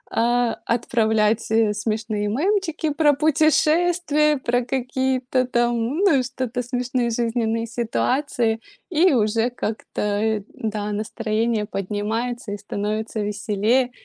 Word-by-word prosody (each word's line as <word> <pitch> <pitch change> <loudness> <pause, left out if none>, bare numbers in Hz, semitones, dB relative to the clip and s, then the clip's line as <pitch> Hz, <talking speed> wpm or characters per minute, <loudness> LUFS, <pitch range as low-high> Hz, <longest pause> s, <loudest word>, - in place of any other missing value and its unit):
э, 240 0 +2
отправлять, 220 -2 +1
э, 220 -2 +3
смешные 215 -1 -2
мемчики 325 - 0
про 295 -1 +4
путешествия, 310 +1 +3
про 245 -1 0
какие-то 255 0 0
там 240 -1 +1 0.2
ну 375 -8 +4
и 255 - 0
что-то 250 -1 -3
смешные 245 0 -1
жизненные 230 -1 0
ситуации, 235 0 0 0.3
и 355 +1 +4
уже 225 0 +2
как-то 210 -3 -3
и 220 -2 0
да 210 -1 -3
настроение 220 +1 -1
поднимается 210 +3 -3
и - - -4
становится 210 +2 -3
веселее. 210 +4 0
235 Hz, 110 wpm, -22 LUFS, 215-260 Hz, 0.3 s, про